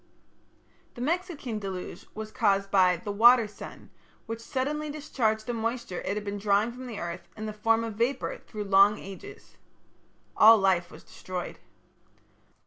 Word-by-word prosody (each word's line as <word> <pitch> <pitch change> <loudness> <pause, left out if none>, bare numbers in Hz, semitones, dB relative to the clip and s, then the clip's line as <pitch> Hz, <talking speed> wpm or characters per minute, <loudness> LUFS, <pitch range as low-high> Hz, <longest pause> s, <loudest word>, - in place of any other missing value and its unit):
The 240 - -8
Mexican 300 - -2
deluge 190 -3 -6
was 215 0 -6
caused 195 -5 +1
by 185 -2 +4
the 205 +4 -5
"water 230 +2 +6
sun", 210 - -11 0.3
which 225 0 -5
suddenly 295 +5 -2
discharged 235 -7 -1
the 240 - -3
moisture 230 -4 -3
it 200 - -2
had 210 - -4
been 205 0 -4
drawing 205 +3 +2
from 255 +1 -9
the 230 -4 -6
earth 170 +1 -6
in 215 - -5
the 215 - -4
form 225 +2 +2
of 225 -1 -4
vapour 240 +4 -1
through 210 -2 -7
long 200 +1 +5
ages. 195 -2 -11 0.8
All 225 +1 +8
life 190 -3 +2
was - - -13
destroyed. 180 -1 -7
215 Hz, 155 wpm, -28 LUFS, 195-240 Hz, 0.8 s, All